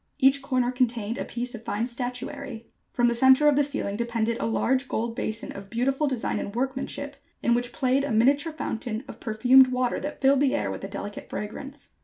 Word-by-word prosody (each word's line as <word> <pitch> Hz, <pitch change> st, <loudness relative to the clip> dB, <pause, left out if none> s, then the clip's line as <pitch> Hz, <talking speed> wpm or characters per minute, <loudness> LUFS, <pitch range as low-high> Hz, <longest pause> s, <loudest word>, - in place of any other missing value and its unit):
Each 270 Hz, +1 st, +4 dB
corner 255 Hz, -2 st, 0 dB
contained 235 Hz, -3 st, -1 dB
a -, -, -2 dB
piece 245 Hz, +1 st, -4 dB
of 235 Hz, -1 st, -8 dB
fine 220 Hz, +1 st, -1 dB
statuary. 250 Hz, 0 st, -5 dB, 0.2 s
From 240 Hz, -1 st, +2 dB
the 235 Hz, -, +2 dB
centre 260 Hz, +4 st, +5 dB
of 295 Hz, -, +5 dB
the 290 Hz, -, +4 dB
ceiling 275 Hz, -8 st, -2 dB
depended 235 Hz, -1 st, -1 dB
a -, -, -1 dB
large 255 Hz, +4 st, +1 dB
gold 230 Hz, 0 st, -2 dB
basin 220 Hz, -3 st, -3 dB
of 195 Hz, 0 st, -9 dB
beautiful 270 Hz, +5 st, 0 dB
design 260 Hz, -4 st, -1 dB
and 200 Hz, -, -5 dB
workmanship, 270 Hz, +2 st, -3 dB, 0.3 s
in 235 Hz, -, +3 dB
which 245 Hz, 0 st, 0 dB
played 265 Hz, +2 st, +1 dB
a 285 Hz, -, -2 dB
miniature 280 Hz, +8 st, +3 dB
fountain 230 Hz, -6 st, -4 dB
of -, -, -10 dB
perfumed 250 Hz, +4 st, +5 dB
water 250 Hz, -1 st, 0 dB
that 295 Hz, -, -5 dB
filled 275 Hz, 0 st, +4 dB
the 280 Hz, 0 st, +2 dB
air -, -, -1 dB
with -, -, -6 dB
a -, -, -3 dB
delicate 205 Hz, +1 st, -7 dB
fragrance. 270 Hz, +8 st, -7 dB
250 Hz, 205 wpm, -26 LUFS, 230-270 Hz, 0.3 s, centre